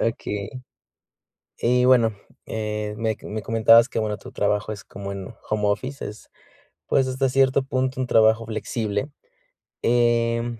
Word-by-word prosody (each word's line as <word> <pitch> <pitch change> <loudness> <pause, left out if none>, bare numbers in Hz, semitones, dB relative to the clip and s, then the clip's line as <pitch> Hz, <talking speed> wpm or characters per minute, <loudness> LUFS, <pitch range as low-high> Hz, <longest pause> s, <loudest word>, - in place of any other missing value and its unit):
Okey. 105 -3 -2 1.1
Y 125 +1 +3
bueno, 120 -4 +5 0.3
eh, 105 -1 -3
me 110 -1 -1
me 110 +1 -5
comentabas 115 +2 +5
que, - - -2
bueno, 105 -1 -2
tu 125 - -12
trabajo 105 -1 0
es 100 -2 -7
como 100 0 -8
en 100 +2 -7 0.2
home 105 -1 -1
office, 130 +7 -2
es, 105 +1 -11 0.6
pues, 135 -1 +2
hasta 130 +1 0
cierto 135 +1 +3
punto 130 0 -1
un 130 - 0
trabajo 110 0 +4
flexible. 110 +1 -3 0.7
Em, 120 -1 +1
115 Hz, 140 wpm, -23 LUFS, 105-125 Hz, 1.1 s, bueno